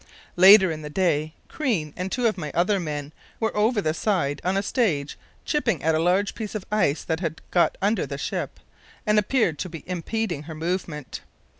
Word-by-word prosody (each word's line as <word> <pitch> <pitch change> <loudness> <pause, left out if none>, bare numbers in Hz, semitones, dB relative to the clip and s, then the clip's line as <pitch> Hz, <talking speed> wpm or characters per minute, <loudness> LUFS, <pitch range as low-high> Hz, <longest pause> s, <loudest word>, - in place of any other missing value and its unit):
Later 190 0 +8
in 155 -1 -5
the 150 - -7
day 155 -2 0
Crean 200 - -2
and 185 +1 -4
two 250 -1 -1
other 180 +1 0
men 150 -3 -5 0.3
were 225 -1 -1
over 210 +1 +2
the 155 -4 0
side 165 -6 0
on 185 +3 +1
a 195 - 0
stage 175 - 0 0.3
chipping 235 - 0
at 160 +1 +3
a 155 - +2
large 185 +4 +2
piece 215 -2 -6
of 205 - -4
ice 185 -9 +1
that 160 -1 -2
had 165 -3 -3
got 175 - +2
under 210 +3 +1
the - - -5
ship - - -4 0.5
and 210 -1 +4
appeared 210 - +1
to 185 - -3
be 165 -2 -9
impeding 180 -1 -2
her 160 - -6
movement. 165 -3 -4
180 Hz, 185 wpm, -24 LUFS, 155-210 Hz, 0.5 s, Later